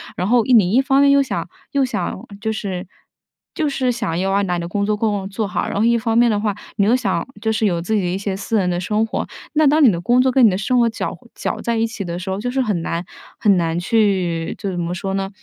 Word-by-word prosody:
然 180 - -2
后 240 0 +4
你 215 -7 +4
一 255 +4 +4
方 270 0 +3
面 280 - +5
又 280 0 +5
想 270 - -4 0.2
又 280 -2 +2
想 255 - -3 0.2
就 220 0 -1
是 190 -4 -4 0.7
就 310 - 0
是 260 -3 0
想 225 -9 -2
要 195 +1 0
把 180 -2 -1
你 - - -2
的 170 - -4
工 200 +3 -1
作 210 +1 +1
工 205 -3 -1
做 205 +1 -2
好， - - -2
然 - - -4
后 205 - +1
一 235 0 +4
方 225 0 -1
面 240 0 +5
的 210 -2 +1
话， 205 -2 -1 0.2
你 200 - +3
又 225 +4 +4
想 200 -5 -1
就 220 0 0
是 220 0 0
有 170 -4 +1
自 220 +5 -1
己 210 - +2
的 180 - -1
一 180 +2 -1
些 195 -1 -3
私 220 +3 -3
人 180 - 0
的 175 0 -1
生 210 +4 0
活。 - - -3 0.3
那 310 0 +3
当 300 +2 +4
你 245 - +7
的 170 - -2
工 245 +8 +3
作， 260 0 +2
跟 255 -1 +5
你 220 - +7
的 185 - -1
生 250 +4 +1
活 235 - +4
搅 225 - -4 0.2
搅 - - -3
在 235 - -1
一 225 0 +1
起 220 -4 -6
的 170 0 -4
时 185 +1 -6
候， 190 +1 -2
就 245 +3 -3
是 265 +1 0
很 205 -8 -1
难 170 +1 -2 0.4
很 200 -3 +4
难 165 -1 0
去 180 -5 +1
就 200 - -3
怎 175 - -4
么 175 +1 -2
说 195 +2 -3
呢， 195 0 -2
210 Hz, 305 characters per minute, -20 LUFS, 185-235 Hz, 0.7 s, 你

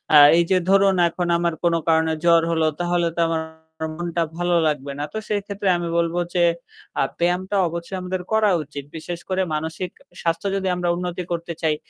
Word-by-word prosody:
আ - - +11 0.2
এই 170 - +5
যে 185 - +5
ধরুন 195 0 +5
এখন 175 +1 -3
আমার 170 -1 0
কোনো 170 -1 +3
কারণে 160 0 +3
জ্বর 170 -1 +6
হলো 160 -1 +2
তাহলে 175 -1 +1
তো - - +2
আমার 165 -1 0 0.5
মনটা 170 0 -1
ভালো 175 0 +1
লাগবে 145 -2 -2
না। - - -1
তো - - -3
সেইক্ষেত্রে 200 -1 -1
আমি 175 - -3
বলব 170 0 +1 0.2
যে, 175 - +3 0.6
আ - - +4 0.2
ব্যায়ামটা 180 +3 0
অবশ্যই 170 +3 -5
আমাদের 185 0 -3
করা 220 -1 +4
উচিত। 145 -1 -8
বিশেষ 170 +2 -6
করে 190 0 +1
মানসিক 160 +3 -4 0.3
স্বাস্থ্য 165 +3 -1
যদি 190 -1 -1
আমরা 175 -1 -1
উন্নতি 180 0 -3
করতে 170 0 -3
চাই। 155 -2 +2
175 Hz, 185 wpm, -22 LUFS, 165-185 Hz, 0.6 s, আ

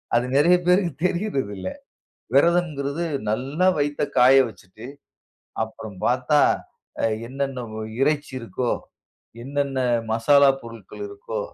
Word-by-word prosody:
அது 120 - +2
நெறைய 170 +5 +6
பேருக்கு 180 -3 +3
தெரியரதில்ல. 135 - -3 0.7
விரதம்ங்குறது 165 -1 +2 0.3
நல்ல 135 +9 -3 0.2
வயித்த 145 0 -1 0.2
காய 130 +2 +7
வச்சிட்டு 110 +3 -13 0.8
அப்புறம் 110 -2 -10
பாத்தா, 130 +4 +2 0.9
என்னென்ன 135 -1 -3 0.4
இறைச்சி 145 0 +1
இருக்கோ, 115 +2 -3 0.7
என்னென்ன 140 0 -2 0.3
மசாலா 140 +5 +5
பொருட்கள் 115 - -10
இருக்கோ, 485 +4 -6
140 Hz, 95 wpm, -23 LUFS, 120-155 Hz, 0.9 s, காய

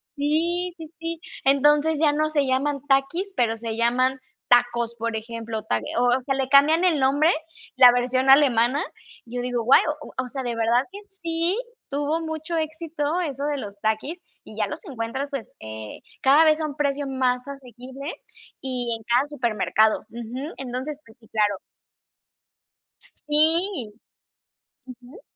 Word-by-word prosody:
sí, 335 +5 0
sí, 320 -2 -10
sí, 330 0 -4 0.2
entonces 295 +3 +4
ya 300 -2 +3
no 310 +1 +1
se 295 -2 +1
llaman 275 +2 0
Takis, 335 +9 +1
pero 230 -2 +1
se 225 -1 -4
llaman 250 +3 +2 0.3
tacos, 240 -1 +3
por 230 0 -3
ejemplo, 225 0 -5
ta 160 - 0 0.2
o - - +3
o 245 +2 +2
sea, 270 -1 0
le 265 -1 -1
cambian 300 +5 +5
el 335 -6 +3
nombre, 285 +4 +3 0.5
la 250 -1 +9
versión 255 +2 +1
alemana, 270 0 +5 0.4
yo 245 +1 -5
digo: 245 -1 -2
"Guau", 250 +4 +6 0.4
o 260 - -2
sea, 265 +1 -5
de 240 -2 -2
verdad 230 +2 +2
que 405 - -8
sí 340 -1 -2 0.3
tuvo 290 +3 -1
mucho 320 +1 -4
éxito 315 0 -2
eso 285 -4 -3
de 290 - -1
los 205 -5 -8
Takis, 220 +11 -2 0.2
y - - -13
ya - - 0
los - - -7
encuentras, 260 0 -4
pues, 275 -7 -6
eh, 110 -1 -8 0.2
cada 280 +4 +6
vez 310 0 +4
a - - 0
un 290 - -7
precio 285 -1 -1
más 255 -1 0
asequible 265 +2 -8 0.5
y 255 -2 -2
en 225 - -17
cada 245 +5 +2
supermercado, 220 -5 +1
ujú. 240 +7 -6
Entonces, 265 +3 -5
pues 225 +2 -19
sí, 220 - -20
claro. 205 -3 +1 1.5
Sí. 315 - +1 0.9
Ujú. 255 - -13
270 Hz, 155 wpm, -24 LUFS, 240-305 Hz, 1.5 s, la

